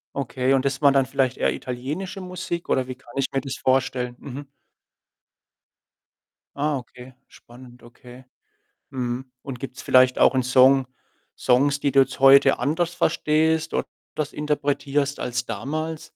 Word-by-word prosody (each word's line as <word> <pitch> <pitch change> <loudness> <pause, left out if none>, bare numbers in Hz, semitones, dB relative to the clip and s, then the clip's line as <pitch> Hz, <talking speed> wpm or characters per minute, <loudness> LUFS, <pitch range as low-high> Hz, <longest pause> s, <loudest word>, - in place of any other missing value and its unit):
Okay. 130 0 -1
Und 130 - +2
das 140 +1 -2
war 140 - +6
dann 135 -1 +3
vielleicht 130 -1 0
eher - - +1
italienische 150 +11 -5
Musik 180 -1 -6
oder 130 -1 +1
wie 130 - -6
kann 120 -1 -18
ich 135 -1 +1
mir 135 - 0
das 135 -1 -5
vorstellen? 130 -2 0
Mhm. 140 +1 -8 2.1
Ah, 145 0 0
okay. 125 +1 -12
Spannend. 125 0 -16
Okay. 125 +2 -15 0.7
Mhm. 125 0 -4
Und 130 -3 -7
gibt's 135 +1 -8
vielleicht 130 0 +4
auch - - +5
'n 130 - +2
Song 130 +1 +5 0.5
Songs, 140 +3 +2
die 140 - +1
du 135 - +6
jetzt 130 -1 -1
heute 135 0 +6
anders 170 +4 -1
verstehst 160 0 +1
oder - - -1 0.3
das 150 -2 -3
interpretierst 145 -1 -1
als 125 0 -2
damals? 155 +8 -4
135 Hz, 150 wpm, -23 LUFS, 125-145 Hz, 2.1 s, war